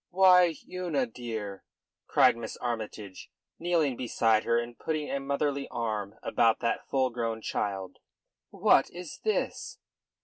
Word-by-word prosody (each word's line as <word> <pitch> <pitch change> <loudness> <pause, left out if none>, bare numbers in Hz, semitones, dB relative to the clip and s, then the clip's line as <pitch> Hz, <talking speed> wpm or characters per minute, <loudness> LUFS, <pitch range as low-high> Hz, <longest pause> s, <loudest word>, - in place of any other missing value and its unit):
"Why, 180 -2 +6
Una 175 -7 -1
dear," 110 -4 -6 0.4
cried - - +5
Miss 115 -1 -7
Armytage, 110 -5 -5 0.3
kneeling 165 -6 +1
beside 115 -3 +1
her 115 0 +3
and 120 0 -3
putting 155 +2 -3
a 140 - -1
motherly 140 0 -1
arm 110 -4 -3
about 115 -1 +3
that 115 - -1
full 130 -2 +1
grown 115 -2 -2
child, 95 -2 -3 0.5
"what - - +4
is 175 -2 -9
this?" 435 - -2
120 Hz, 130 wpm, -29 LUFS, 110-150 Hz, 0.5 s, Why